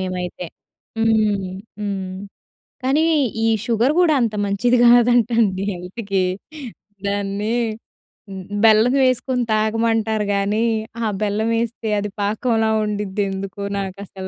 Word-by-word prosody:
మేమైతే. 180 -1 -4 0.5
హ్మ్. 215 -4 +1 0.3
హ్మ్. 195 -2 -4 0.7
కానీ, 280 +5 +2 0.4
ఈ - - +3 0.2
షుగర్ 235 +4 +2
కూడా 335 -3 +4
అంత 225 -3 0
మంచిది 225 +5 +2
కాదంటండి 235 -4 +4
హెల్త్‌కి. 190 +2 -3 0.8
దాన్ని 200 +2 -2 0.8
హ్మ్. 190 -1 -7
హ్మ్. 205 0 -3
బెల్లమేసుకొని 250 +3 +3
తాగమంటారు 220 0 0
గాని, 205 +3 +1 0.4
ఆ - - +1 0.2
బెల్లం 215 +2 0
ఎస్తే 230 -1 -5
అది 205 0 -4
పాకంలా 220 +2 +1 0.2
ఉండిద్దిదెందుకో 200 -1 -3 0.2
నాకు 195 -1 -5
అసలు 190 0 -8
210 Hz, 105 wpm, -20 LUFS, 195-230 Hz, 0.8 s, కూడా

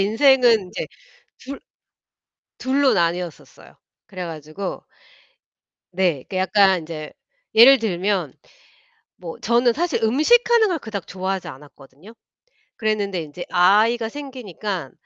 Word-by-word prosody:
인생은 235 +2 +4
인제 180 - -6 0.5
둘 275 +2 -9 1.0
둘로 265 0 +1
나뉘었었어요. 170 -3 -4 0.3
그래 185 -2 -7
가지고 160 +3 -7 1.1
네. 175 -7 0
그 190 - -6
약간 190 -1 +3
인제 155 -1 -8 0.4
예를 255 +4 +8
들면 195 -2 -2 0.8
뭐 170 -2 -9
저는 240 +1 +2
사실 340 +5 -2
음식하는 440 - +3
걸 345 -3 -2
그닥 215 -7 -7
좋아하지 190 -1 -4
않았거든요. 145 - -15 0.6
그랬는데 205 -4 -2
인제 155 +3 -9
아이가 215 +6 +3
생기니까 215 - -6
200 Hz, 250 characters per minute, -21 LUFS, 175-240 Hz, 1.1 s, 예를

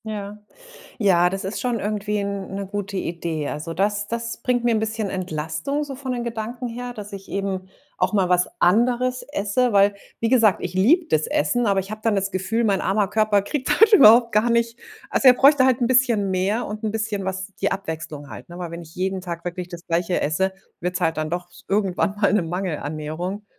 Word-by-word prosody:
Ja. 210 -1 -6 0.6
Ja, 180 -5 +4
das 195 +1 -4
ist 195 +3 -4
schon 245 -3 -1
irgendwie 210 0 -2
'n 200 -1 -3
'ne 200 0 -4
gute 200 0 -4
Idee. 165 -4 -3
Also, 160 +3 -5
das 205 +3 -1
das 230 0 -3
bringt 245 -1 +1
mir 240 0 +2
'n - - +2
bisschen 220 -1 -2
Entlastung 185 - -3
so 280 -2 -7
von 260 -1 -4
den 245 -1 -3
Gedanken 235 +1 -4
her, 245 +1 -6
dass 210 -2 -9
ich 195 -1 -10
eben 195 -1 -3 0.3
auch - - 0
mal 195 -3 +2
was 180 0 +3
anderes 245 +6 +2
esse. 235 +1 +1
Weil, 200 0 +4 0.3
wie 230 - +1
gesagt, 225 -5 +4
ich 180 0 -4
liebe 290 - +4
das 155 0 +1
Essen, 240 +11 +1
aber 200 -2 +2
ich 195 +1 -9
habe 215 0 -7
dann 225 -2 +2
das 195 0 0
Gefühl, 200 +5 -1
mein 200 -3 +1
armer 195 +2 +1
Körper 215 -1 +2
kriegt 255 +6 -3
halt 445 0 +7
überhaupt 235 - +7
gar 215 +3 +3
nicht 235 0 +1 0.3
also 270 - +4
er 250 - +9
bräuchte 275 +1 +5
halt 260 -1 +3
'n 240 - +2
bisschen 240 -6 +3
mehr 195 +5 0
und 210 +1 -6
'n 215 - 0
bisschen 215 -2 -2
was 190 +1 -4
die 195 - 0
Abwechslung 160 -6 -6
halt, - - -10
ne? 175 - -9
Weil 175 -2 -5
wenn 170 +1 -7
ich 160 -1 -14
jeden 190 0 -2
Tag 170 -2 -6
wirklich 175 0 -4
das 175 -1 -10
Gleiche 175 +1 0
esse, 190 +6 0 0.3
wird's 180 +1 -2
halt 165 -2 +1
dann 155 0 -2
doch 175 +1 -3
s - - -17
irgendwann 195 -1 0
mal 200 - +4
'ne 210 - +3
Mangelernährung. 170 +2 -4
200 Hz, 215 wpm, -22 LUFS, 180-230 Hz, 0.6 s, er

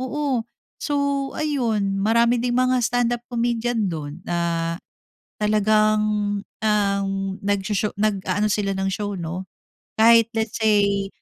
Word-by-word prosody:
oo. 260 -1 -1 0.4
So 280 -1 -1
ayun 225 -10 0
marami 235 +3 +3
ding 245 0 0
mga 255 0 +2
stand-up 240 0 0
comedian 235 -2 0
dun 155 -1 -6
na, 170 -1 -1 0.7
talagang, 215 0 +3 0.4
um, 200 -2 0 0.4
nags-sho 205 +1 0
nag-aano 210 0 0
sila 200 -1 0
ng 190 0 -1
show 205 +1 -3
no. 175 +3 -5 0.5
Kahit 230 0 +6
let's 220 -1 -2
say, 200 -2 +2
215 Hz, 110 wpm, -22 LUFS, 200-240 Hz, 0.7 s, Kahit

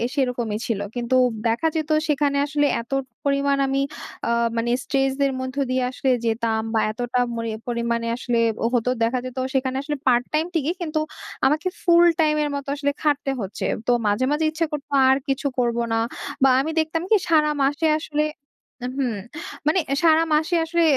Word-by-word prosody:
সেরকমই 245 -6 -1
ছিল। 225 -4 -1 0.2
কিন্তু 245 +1 0 0.3
দেখা 230 +8 +1
যেত 310 -1 -2 0.2
সেখানে 290 -1 +1
আসলে 290 0 +1
এত 235 - -16 0.3
পরিমাণ 280 0 +2
আমি 270 0 0 0.5
আ - - +1 0.3
মানে 235 +1 0
স্ট্রেস 270 -1 +1
দের 275 -1 +3
মধ্যে 260 +2 -3
দিয়ে 255 0 +1
আসলে 265 +1 -1 0.2
যেতাম 225 -1 0
বা 225 - +3
এতটা 245 +2 -2 0.2
মরি 230 0 -3 0.2
পরিমাণে 235 -1 -1
আসলে 245 -1 -1 0.4
হতো 245 +1 +1
দেখা 240 +3 +1
যেত 255 0 -7 0.2
সেখানে 260 -1 0
আসলে 295 +1 -3
পার্ট 245 -1 +4
টাইম 310 +1 +2
ঠিকি 315 0 +1
কিন্তু 310 -2 -1 0.5
আমাকে 305 +6 +2 0.2
ফুল 345 0 +6
টাইম 305 -1 +3
এর 295 - -1
মত 280 -1 -4
আসলে 285 0 0
খাটতে 290 -2 +1
হচ্ছে। 195 0 -4 0.2
তো - - +4 0.2
মাঝে, 205 +5 +2
মাঝে 305 +2 +1
ইচ্ছা 325 +1 0
করত 295 -2 -4 0.2
আর 265 - +5
কিছু 275 +1 0
করব 235 -1 +1 0.2
না। - - +2 0.5
বা 270 - +7
আমি 310 +4 -2
দেখতাম 320 +1 0
কি? 445 - +6
সারা 305 -2 +4
মাসে 290 +4 +1
আসলে 300 -1 -1 0.6
আ - - -1
হুম 260 -3 0 0.6
মানে 315 +5 +4 0.2
সারা 325 -1 +5
মাসে 315 +3 +2
আসলে 340 +1 +1
275 Hz, 175 wpm, -23 LUFS, 245-305 Hz, 0.6 s, বা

